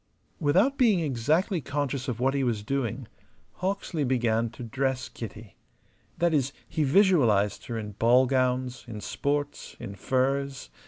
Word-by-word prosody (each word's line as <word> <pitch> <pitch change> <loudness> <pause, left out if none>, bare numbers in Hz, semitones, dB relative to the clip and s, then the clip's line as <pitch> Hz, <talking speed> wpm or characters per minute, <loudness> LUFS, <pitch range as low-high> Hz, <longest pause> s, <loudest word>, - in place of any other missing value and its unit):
Without 190 - +3
being 220 -8 +5
exactly 155 - +1
conscious 140 0 -2
of 120 -3 -3
what 135 +2 +2
he 140 -1 0
was 115 -5 -1
doing, 130 0 -2 0.5
Hawksley 185 -4 -2
began 115 -3 +1
to 120 +2 -10
dress 130 +2 -1
Kitty 110 -2 -9 0.6
that 170 -1 +2
is, 140 -2 +1
he 160 -1 -1
visualized 135 - +3
her 115 - -3
in 105 -1 -5
ball 120 +5 +4
gowns, 130 -1 0
in 110 -3 -6
sports, 145 +6 -3
in 100 - -6
furs. 135 - -1
130 Hz, 145 wpm, -27 LUFS, 115-145 Hz, 0.6 s, being